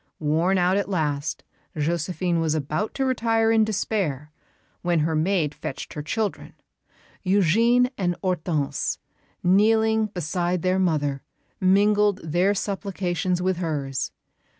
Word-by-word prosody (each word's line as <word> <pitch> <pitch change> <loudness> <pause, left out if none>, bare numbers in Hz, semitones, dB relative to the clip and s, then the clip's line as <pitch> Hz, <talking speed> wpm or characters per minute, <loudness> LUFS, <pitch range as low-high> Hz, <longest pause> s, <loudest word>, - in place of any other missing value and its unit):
Worn 165 +5 +1
out 180 +2 +3
at 200 - -1
last, 155 -5 -2 0.3
Josephine 170 +3 -1
was 160 -1 +1
about 155 +8 -2
to 270 - 0
retire 225 -3 +2
in 225 -1 +4
despair, 185 -9 -2 0.5
when 175 -2 +1
her 160 +1 0
maid 160 -1 +1
fetched 155 -3 -7
her 150 - -4
children. 210 +7 -3 0.7
Eugène 225 +7 +3
and 175 -2 0
Hortense, 170 -6 -1 0.5
kneeling 220 +3 +3
beside 175 -1 -2
their 185 +1 +2
mother, 145 -6 0 0.4
mingled 205 +1 +3
their 175 +6 +1
supplications 185 -3 -2
with 185 -1 +1
hers. 145 -6 -2
180 Hz, 120 wpm, -24 LUFS, 155-205 Hz, 0.7 s, in